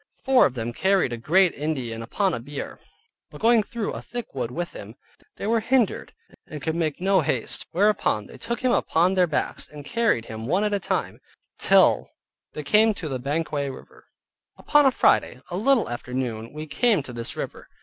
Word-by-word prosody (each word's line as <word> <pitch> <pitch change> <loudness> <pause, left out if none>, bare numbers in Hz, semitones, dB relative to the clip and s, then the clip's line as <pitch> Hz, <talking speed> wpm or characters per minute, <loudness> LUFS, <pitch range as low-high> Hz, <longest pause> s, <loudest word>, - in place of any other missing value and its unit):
Four 265 -1 +5
of 130 - -9
them 120 0 -3
carried 190 -5 +2
a - - -3
great 175 +9 +3
Indian 130 -7 -3
upon 185 - 0
a - - -2
bier; 140 +4 -7 0.5
but - - -12
going 230 0 +5
through 220 +1 -4
a - - -6
thick 240 -2 -7
wood 125 -4 -3
with 175 +7 -5
him, 105 +3 -10 0.4
they - - -6
were 225 +2 +2
hindered, 235 -1 +1 0.4
and 150 - -7
could 160 +3 -2
make 160 -3 -1
no 190 0 +3
haste, 130 -5 -2
whereupon 195 - +1
they - - -13
took 235 0 -4
him 255 -1 +2
upon 175 -4 +2
their 180 -2 +3
backs, 150 -2 -2
and 145 -1 -11
carried 230 - +1
him, 110 +1 -7
one 185 +8 +1
at 210 -1 0
a 200 - +1
time, - - -3 0.4
till - - +4 0.4
they 150 - -5
came 215 +6 +4
to 160 -6 -5
Banquaug 145 0 -2
river. - - -16 0.5
Upon 295 -2 +4
a - - +4
Friday, 125 - +2
a - - -3
little 240 +5 +3
after 120 +1 -6
noon, 115 -3 -3
we 155 +1 -7
came 210 - +1
to 125 - -9
this 115 -1 -4
river. - - -6
160 Hz, 195 wpm, -24 LUFS, 130-210 Hz, 0.5 s, Four